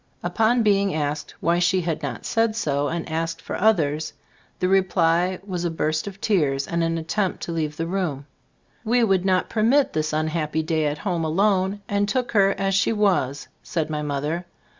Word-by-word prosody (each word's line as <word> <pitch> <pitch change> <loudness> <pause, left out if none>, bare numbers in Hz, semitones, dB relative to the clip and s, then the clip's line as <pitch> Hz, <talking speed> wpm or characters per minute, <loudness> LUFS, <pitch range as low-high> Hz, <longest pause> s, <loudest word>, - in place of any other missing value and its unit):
Upon 220 +7 +2
being 200 -3 +2
asked 150 -1 -3
why 170 +1 +2
she 180 +1 +2
had 165 -2 -2
not 130 -7 -5
said 225 -1 +1
so 145 -9 0
and 165 +2 -3
asked 165 0 -2
for - - -6
others, 160 -8 +1 0.4
the 180 - 0
reply 180 -1 +2
was 180 -3 -3
a 175 - 0
burst 155 +1 -1
of 200 0 -8
tears 145 -11 +1
and 170 -1 0
an 165 0 0
attempt 185 +4 -2
to - - -4
leave 155 -2 -2
the 165 - -2
room. 165 -6 -2 0.6
"We 240 +1 +2
would 190 -4 +2
not 185 -1 +2
per 215 - -2
mit 265 +6 +3
this 155 0 -1
unhappy 155 0 -1
day 155 -1 0
at 145 +1 -2
home 175 -2 -2
alone, 190 +4 +1
and 205 0 0
took 250 +2 -1
her 195 -3 +3
as 195 0 0
she 200 +3 +2
was," 185 - +1
said 160 -2 -3
my 150 -1 -2
mother. 150 +4 -3
175 Hz, 190 wpm, -23 LUFS, 155-195 Hz, 0.6 s, mit